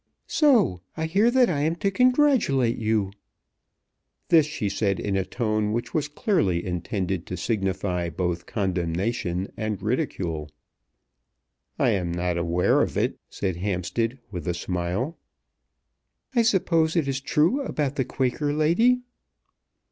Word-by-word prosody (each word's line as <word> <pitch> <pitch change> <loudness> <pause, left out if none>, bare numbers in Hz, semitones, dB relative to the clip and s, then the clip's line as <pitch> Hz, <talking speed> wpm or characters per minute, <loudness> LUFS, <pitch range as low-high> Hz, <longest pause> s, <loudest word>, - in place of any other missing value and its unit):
So 230 - +3 0.2
I 160 - -1
hear 200 +8 +3
that 250 0 +4
I 150 -5 0
am 160 +3 +1
to 195 +3 0
congratulate 250 - +3
you." 110 -3 0 1.2
This 160 -3 +5
she 130 -9 -3
said 100 -1 0
in 100 -1 -1
a 95 - +1
tone 110 +1 -1
which 120 +1 -3
was 150 -2 0
clearly 145 - 0
intended 90 0 -3
to 90 - -4
signify 95 -3 -1
both 85 +1 -3
condemnation 90 0 -2
and 110 -3 -3
ridicule. 90 - -2 1.3
"I - - +3
am 90 -4 -1
not 90 0 -1
aware 85 +1 +2
of - - -1
it," - - 0
said 95 -4 -3
Hampstead 100 +6 -1
with 90 -2 -6
a 90 - 0
smile. 90 - -3 1.1
"I 240 - +4
suppose 175 -7 +2
it 160 -5 +1
is 135 0 -1
true 165 - +2
about 150 - -2
the 130 - +1
Quaker 135 +3 -1
lady?" 180 +12 +3
110 Hz, 135 wpm, -25 LUFS, -, 1.3 s, This